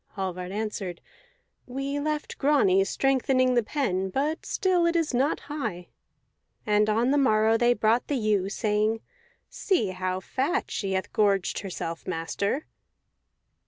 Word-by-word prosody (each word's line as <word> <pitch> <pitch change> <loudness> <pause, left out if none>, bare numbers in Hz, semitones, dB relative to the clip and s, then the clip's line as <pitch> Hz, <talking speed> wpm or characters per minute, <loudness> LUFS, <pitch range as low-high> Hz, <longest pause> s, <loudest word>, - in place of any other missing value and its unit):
Hallvard 185 -2 -4
answered, 205 -4 -4 0.7
"We 275 +3 -3
left 300 +1 -3
Grani 260 -10 +4
strengthening 260 +1 +2
the 240 - +4
pen, 200 -7 -1
but 290 - -2
still 360 -3 +2
it 340 - 0
is 330 -5 +1
not 270 +5 +1
high." 220 - -5 0.8
And 210 -1 +3
on 230 +4 +2
the 290 - +3
morrow 220 -4 +3
they 240 +1 +3
brought 225 +2 +2
the 285 - 0
ewe, 210 -4 +1
saying, 215 +1 0 0.5
"See 355 - 0
how 185 0 -2
fat 280 - -2
she 195 -2 -2
hath 190 0 -2
gorged 200 -3 +2
herself, 170 -4 -6
master." 185 - -2
220 Hz, 135 wpm, -26 LUFS, 195-275 Hz, 0.8 s, Grani